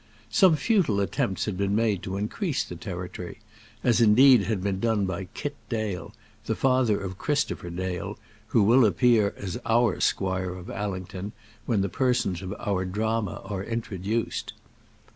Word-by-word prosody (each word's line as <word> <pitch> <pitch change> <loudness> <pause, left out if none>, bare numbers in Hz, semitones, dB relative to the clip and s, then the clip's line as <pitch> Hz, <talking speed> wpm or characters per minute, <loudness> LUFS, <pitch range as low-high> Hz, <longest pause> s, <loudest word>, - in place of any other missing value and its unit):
Some 190 -7 +6
futile 165 - +2
attempts 95 0 -1
had 105 - -2
been 100 +1 0
made 110 -4 +1
to 95 +1 -4
increase 140 - -1
the 90 - -8
territory, 90 0 -6 0.5
as 120 -1 +3
indeed 115 0 +7
had 100 -2 -1
been 100 -1 -1
done 110 -2 +1
by 95 0 -3
Kit 145 -1 -4
Dale, 110 -6 -3 0.4
the - - 0
father 130 -5 +2
of 95 -2 -6
Christopher 145 -11 -1
Dale, 90 0 -4 0.3
who 110 - +3
will 120 +5 +6
appear 110 +1 +3
as 100 +4 -5
our 115 -2 +2
squire 95 -1 0
of 90 0 -8
Allington 95 0 -5 0.3
when 110 -5 +2
the 100 - +1
persons 110 -5 0
of 95 -1 -6
our 95 -3 -1
drama 105 +1 -2
are 95 -2 -4
introduced. 115 -1 -3
100 Hz, 155 wpm, -26 LUFS, 95-115 Hz, 0.5 s, indeed